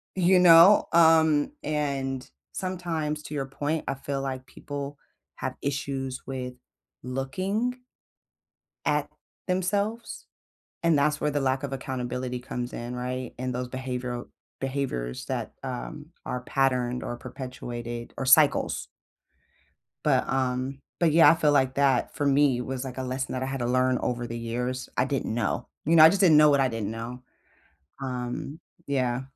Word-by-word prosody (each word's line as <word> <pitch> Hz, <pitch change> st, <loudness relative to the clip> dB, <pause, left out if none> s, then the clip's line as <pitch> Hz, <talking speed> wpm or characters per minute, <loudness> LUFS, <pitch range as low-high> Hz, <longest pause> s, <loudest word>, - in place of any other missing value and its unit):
You 185 Hz, 0 st, +4 dB
know? 175 Hz, +3 st, +8 dB
Um, 160 Hz, -, +5 dB
and 135 Hz, -3 st, -2 dB, 0.2 s
sometimes, 165 Hz, -5 st, -3 dB
to 150 Hz, -, -8 dB
your 135 Hz, -2 st, -2 dB
point, 145 Hz, +3 st, -2 dB
I 135 Hz, -, -1 dB
feel 135 Hz, 0 st, -4 dB
like 130 Hz, -1 st, -4 dB
people 145 Hz, 0 st, -7 dB, 0.4 s
have -, -, -4 dB
issues 135 Hz, -2 st, -3 dB
with 125 Hz, -1 st, -5 dB, 0.5 s
looking 190 Hz, -, -2 dB, 1.1 s
at -, -, +1 dB, 0.4 s
themselves, 200 Hz, +5 st, -1 dB, 0.6 s
and 165 Hz, -2 st, +4 dB
that's 150 Hz, +1 st, +1 dB
where 150 Hz, -, +1 dB
the 145 Hz, -, 0 dB
lack 130 Hz, 0 st, 0 dB
of 140 Hz, -, -3 dB
accountability 125 Hz, -1 st, -3 dB
comes 125 Hz, 0 st, -5 dB
in, 120 Hz, +1 st, -5 dB
right, 125 Hz, 0 st, -4 dB
and 130 Hz, 0 st, -2 dB
those 125 Hz, 0 st, -3 dB
behavioral 125 Hz, -1 st, -4 dB, 0.3 s
Behaviors 130 Hz, -, -3 dB
that, -, -, -3 dB
um, 145 Hz, +4 st, -6 dB, 0.2 s
are 125 Hz, -, -3 dB
patterned 125 Hz, -2 st, 0 dB
or 120 Hz, -, -4 dB
perpetuated 120 Hz, -2 st, -7 dB
or 135 Hz, -, -2 dB
cycles. 140 Hz, +3 st, +4 dB, 1.2 s
But, -, -, +2 dB
um, 130 Hz, 0 st, -1 dB, 0.2 s
but, 165 Hz, -3 st, +4 dB
yeah, 165 Hz, 0 st, +8 dB
I -, -, +3 dB
feel 155 Hz, -2 st, +3 dB
like 130 Hz, -2 st, +3 dB
that 135 Hz, -3 st, +2 dB
for 145 Hz, -, 0 dB
me 135 Hz, -3 st, +3 dB
was, 130 Hz, +1 st, -4 dB
like, 130 Hz, 0 st, -6 dB
a -, -, -2 dB
lesson 130 Hz, +1 st, -3 dB
that 130 Hz, -, -2 dB
I 130 Hz, -, -2 dB
had 135 Hz, 0 st, -3 dB
to -, -, 0 dB
learn 130 Hz, +1 st, +2 dB
over 120 Hz, -1 st, -2 dB
the 115 Hz, -, -5 dB
years 125 Hz, +2 st, -3 dB
I 125 Hz, -, +4 dB
didn't 135 Hz, -4 st, -2 dB
know. 115 Hz, -4 st, -1 dB, 0.2 s
You 165 Hz, +3 st, +3 dB
know, 155 Hz, -, +9 dB
I -, -, +10 dB
just 200 Hz, +2 st, +1 dB
didn't 160 Hz, -5 st, +7 dB
know 150 Hz, -1 st, +7 dB
what 140 Hz, -, +4 dB
I 135 Hz, -, +4 dB
didn't 115 Hz, -3 st, -3 dB
know, 120 Hz, +3 st, -6 dB, 0.8 s
um, 125 Hz, +4 st, -4 dB, 0.3 s
yeah. 130 Hz, -3 st, 0 dB
135 Hz, 155 wpm, -27 LUFS, 125-150 Hz, 1.2 s, I